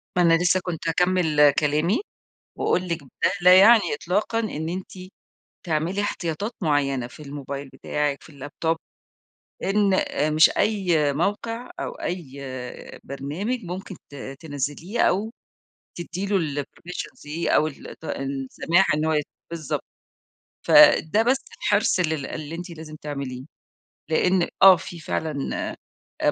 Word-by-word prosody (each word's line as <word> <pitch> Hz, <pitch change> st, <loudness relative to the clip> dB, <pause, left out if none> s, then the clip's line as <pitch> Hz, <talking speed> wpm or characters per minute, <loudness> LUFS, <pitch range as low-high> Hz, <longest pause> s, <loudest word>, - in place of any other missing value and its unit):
ما 180 Hz, -, +3 dB
أنا 170 Hz, -1 st, +5 dB
لسه 180 Hz, +2 st, +3 dB
كنت 170 Hz, -2 st, -4 dB
هاكمل 160 Hz, -4 st, +4 dB
كلامي 155 Hz, -, +1 dB, 0.6 s
وأقول 180 Hz, 0 st, 0 dB
لِك 170 Hz, -2 st, -2 dB
ده 140 Hz, -, -1 dB
لا 180 Hz, +1 st, +8 dB
يعني 220 Hz, +2 st, +6 dB
إطلاقًا 205 Hz, +9 st, -1 dB
إن 160 Hz, -8 st, -3 dB
أنتِ 185 Hz, +2 st, -5 dB, 0.7 s
تعملي 170 Hz, +4 st, 0 dB
احتياطات 200 Hz, +1 st, -2 dB
معيّنة 140 Hz, -6 st, +1 dB
في 150 Hz, -, -12 dB
الموبايل 140 Hz, -1 st, -6 dB
بتاعِك، 145 Hz, -1 st, -2 dB
في -, -, -14 dB
اللاب 145 Hz, -1 st, -9 dB
توب، 165 Hz, 0 st, +2 dB, 0.9 s
إن 200 Hz, 0 st, +2 dB
آآ، 155 Hz, -4 st, 0 dB
مش 155 Hz, +1 st, +6 dB
أي 175 Hz, -9 st, +2 dB
موقع 230 Hz, -, -2 dB
أو -, -, -3 dB
أي 145 Hz, -6 st, -5 dB, 0.6 s
برنامج 165 Hz, -, -4 dB
ممكن 185 Hz, +2 st, -6 dB, 0.2 s
ت -, -, -13 dB, 0.3 s
تنزّليه 150 Hz, -, -4 dB
أو 205 Hz, +4 st, +2 dB, 0.7 s
تدّي 175 Hz, +3 st, -4 dB
له 160 Hz, -8 st, 0 dB
الpermissions 175 Hz, +5 st, -9 dB
دي 155 Hz, +3 st, -1 dB
أو 155 Hz, -, +4 dB
الط 155 Hz, +1 st, -10 dB
السماح 135 Hz, +7 st, 0 dB
إن 155 Hz, -, 0 dB
هو 160 Hz, -, +2 dB
ي 150 Hz, -, +2 dB, 0.3 s
بالضبط، 160 Hz, -4 st, -3 dB, 0.8 s
فده 205 Hz, +8 st, +6 dB
بس 250 Hz, +4 st, +3 dB, 0.2 s
حرص 205 Hz, -3 st, +2 dB
لل 160 Hz, -5 st, -1 dB
اللي 155 Hz, +1 st, -6 dB
أنتِ 175 Hz, +1 st, -7 dB
لازم 155 Hz, -2 st, -9 dB
تعمليه، 140 Hz, -4 st, -6 dB, 0.7 s
لأن 180 Hz, +2 st, +2 dB, 0.2 s
آه 190 Hz, -1 st, +11 dB
في 175 Hz, 0 st, -8 dB
فعلًا 155 Hz, -2 st, -3 dB, 0.8 s
آآ -, -, +4 dB
165 Hz, 135 wpm, -24 LUFS, 145-185 Hz, 0.9 s, آه